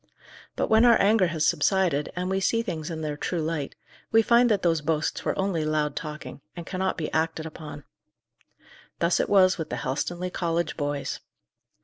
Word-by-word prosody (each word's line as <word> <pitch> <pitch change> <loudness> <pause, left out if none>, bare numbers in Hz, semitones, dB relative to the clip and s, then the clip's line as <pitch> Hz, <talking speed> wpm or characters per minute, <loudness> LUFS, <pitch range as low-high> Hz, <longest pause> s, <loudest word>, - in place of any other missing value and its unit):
But - - 0
when 220 +1 +5
our 240 -1 +6
anger 205 -2 +4
has 160 -2 -1
subsided, 165 -3 +1
and 180 0 -2
we 190 +1 0
see 230 +4 +1
things 160 -8 -4
in 160 -2 -5
their 150 -1 -3
true 170 +4 -3
light, 155 -3 -3 0.4
we 225 0 +5
find 240 +2 +4
that 205 -3 +1
those 165 -3 +2
boasts 150 0 -1
were - - -1
only 190 -5 0
loud 155 -1 0
talking, 150 -2 -7
and 170 -1 -7
cannot 190 0 -2
be 155 -3 -4
acted 160 0 -1
upon. 155 -2 -9 1.1
Thus 170 +1 +2
it - - 0
was 190 -2 +4
with 160 - -4
the - - -3
Helstonleigh 175 +9 -3
college 170 -2 -1
boys. 145 -2 -3
165 Hz, 185 wpm, -26 LUFS, 155-190 Hz, 1.1 s, our